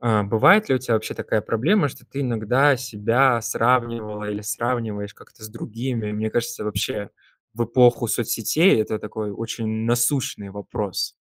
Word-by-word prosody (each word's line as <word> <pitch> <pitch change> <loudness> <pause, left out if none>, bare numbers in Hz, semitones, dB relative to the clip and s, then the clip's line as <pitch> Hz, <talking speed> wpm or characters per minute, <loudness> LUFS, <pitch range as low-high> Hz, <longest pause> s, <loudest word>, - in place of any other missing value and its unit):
а, 110 -4 +2
бывает 145 - +5
ли 130 - +3
у - - 0
тя 125 -1 -3
вообще 110 -1 0
такая 110 - -1
проблема, 145 - +1
что - - -13
ты 140 - -6
иногда 125 +3 +2
себя 120 +1 +2
сравнивала 115 -3 0
или 105 0 -5
сравниваешь 110 -2 -3
как-то - - -20
с 110 - -7
другими? 115 0 -5
Мне 110 +1 -2
кажется, 120 +1 -2
вообще 105 -1 -3 0.4
в 120 +1 -1
эпоху 120 0 +4
соцсетей 120 - +2
это 110 0 -2
такой 105 0 -5
очень 115 +2 -5 0.2
насущный 120 -4 0
вопрос. 100 -1 -4
115 Hz, 155 wpm, -22 LUFS, 105-125 Hz, 0.4 s, бывает